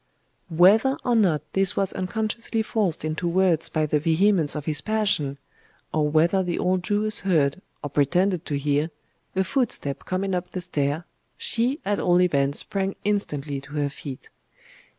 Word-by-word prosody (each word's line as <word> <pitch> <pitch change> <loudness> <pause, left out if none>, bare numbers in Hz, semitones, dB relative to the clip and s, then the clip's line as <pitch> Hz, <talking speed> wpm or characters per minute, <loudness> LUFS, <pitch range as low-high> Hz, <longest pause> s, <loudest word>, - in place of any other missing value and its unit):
Whether 205 - +4
or 245 -2 +1
not 175 -10 +2
this 195 -1 +1
was 195 -1 0
unconsciously 220 +4 -2
forced 200 -9 -1
into 155 +3 -2
words 175 -2 +2
by 155 -1 0
the 150 0 +1
vehemence 165 +1 +2
of 150 -1 -5
his 150 -3 0
passion, 205 -11 0 0.6
or 150 -1 +1
whether 170 +5 +3
the 175 -2 -2
old 185 0 +1
Jewess 210 +3 +1
heard, 165 -3 +1 0.2
or 145 - -3
pretended 175 +5 +1
to 145 - -1
hear, 145 +2 0 0.5
a 190 - +2
footstep 215 - -1
coming 190 +1 -2
up 180 0 -2
the 185 - -5
stair, 150 -1 -1 0.3
she 245 +6 -1
at 205 +1 0
all 175 0 +3
events 140 -5 +2
sprang 195 -1 -3
instantly 150 -9 -2
to 145 +2 -12
her 145 -1 0
feet. 140 -2 -9
180 Hz, 160 wpm, -24 LUFS, 150-200 Hz, 0.6 s, Whether